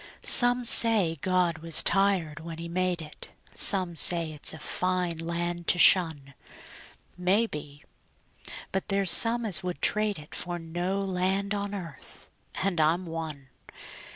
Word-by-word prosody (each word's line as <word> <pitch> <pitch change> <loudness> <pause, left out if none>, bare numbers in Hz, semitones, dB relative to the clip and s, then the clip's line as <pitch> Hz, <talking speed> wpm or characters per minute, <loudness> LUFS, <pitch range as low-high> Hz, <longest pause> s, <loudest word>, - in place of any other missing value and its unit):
Some 245 0 +6
say 210 -10 +3
God 180 -3 0
was 165 -1 +2
tired 190 -6 +1
when 165 0 -9
He 170 +1 -7
made 180 -1 -2
it; 150 - -12 0.2
Some 185 -4 +1
say 165 0 +2
it's 150 -1 -3
a 160 - -8
fine 180 +1 -3
land 170 +1 -5
to - - +3
shun; 160 -7 +4 0.9
Maybe; 180 -7 -2 0.9
but 190 - -4
there's 195 -3 0
some 235 0 +5
as 200 -5 +2
would 180 -1 -6
trade 210 -1 0
it 150 0 -13
For 175 0 -5
no 175 +4 -4
land 195 +1 -2
on 205 0 -4
earth 170 -7 -7 0.3
and 190 -3 -1
I'm 165 +4 0
one. 160 -5 -8
175 Hz, 140 wpm, -26 LUFS, 165-195 Hz, 0.9 s, Some